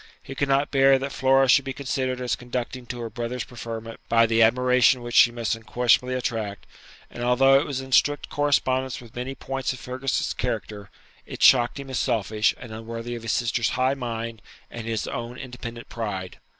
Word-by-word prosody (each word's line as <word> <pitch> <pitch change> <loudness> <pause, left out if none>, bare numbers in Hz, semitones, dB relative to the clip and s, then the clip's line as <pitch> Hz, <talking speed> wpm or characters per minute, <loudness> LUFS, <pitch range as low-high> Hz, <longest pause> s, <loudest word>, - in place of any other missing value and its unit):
He 135 - -8
could 140 +1 -1
not 135 +1 +2
bear 135 -1 +5
that 135 +1 -4
Flora 135 +1 +3
should 135 +2 +5
be 135 0 -4
considered 130 -2 -2
as 120 -4 0
conducing 125 +1 -5
to 120 +1 -6
her 115 - -4
brother's 120 +1 -4
preferment 115 -1 -7
by 115 0 +5
the 115 0 +2
admiration 125 +2 +4
which 120 0 -6
she 120 - +7
must 120 -2 -2
unquestionably 120 +3 +1
attract; 110 -5 -3 0.5
and 120 - -8
although 135 +2 +5
it - - -3
was 135 -2 -3
in 130 0 -10
strict 145 +3 +3
correspondence 130 -3 0
with 120 -2 -15
many 125 +2 -4
points 135 0 -3
of 130 - -10
Fergus's 130 0 -2
character, 100 -2 -4 0.4
it - - -5
shocked 125 +1 +5
him 135 -1 -8
as 130 - -1
selfish, 110 -3 +1
and 120 - -10
unworthy 115 +2 -6
of 120 - -6
his 115 -1 -2
sister's 120 -1 +1
high 130 +1 +2
mind 115 -3 -5 0.3
and 115 -1 -7
his 115 -2 -2
own 120 -1 -5
independent 120 -2 -8
pride. 100 -5 -5
125 Hz, 190 wpm, -24 LUFS, 115-130 Hz, 0.5 s, she